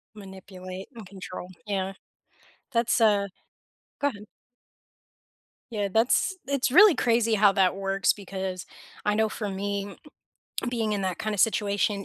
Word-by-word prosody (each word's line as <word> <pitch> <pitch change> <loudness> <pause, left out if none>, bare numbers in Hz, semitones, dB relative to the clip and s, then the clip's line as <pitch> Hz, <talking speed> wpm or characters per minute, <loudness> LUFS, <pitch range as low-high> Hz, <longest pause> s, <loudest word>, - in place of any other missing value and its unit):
Manipulate 190 -1 -9
and 225 -3 -9
control. 185 -1 -8 0.2
Yeah. 195 -2 -2 0.8
That's, 235 -1 +2
uh 205 -3 +4 0.7
Go 285 - +3
ahead. 210 -6 -8 1.5
Yeah, 205 -3 -1
that's 240 +11 +3
it's 280 -1 +1
really 375 +6 +8
crazy 230 -1 +2
how 205 -1 +5
that 190 -1 +3
works 195 0 +1
because 190 -2 -5 0.4
I 210 0 +2
know 220 0 +2
for 210 -1 -4
me 200 +1 -3 0.7
being 225 -3 -1
in 200 -1 -1
that 185 -2 -2
kind 215 -1 -2
of 200 - -1
situation, 200 -1 +1
205 Hz, 135 wpm, -26 LUFS, 195-220 Hz, 1.5 s, really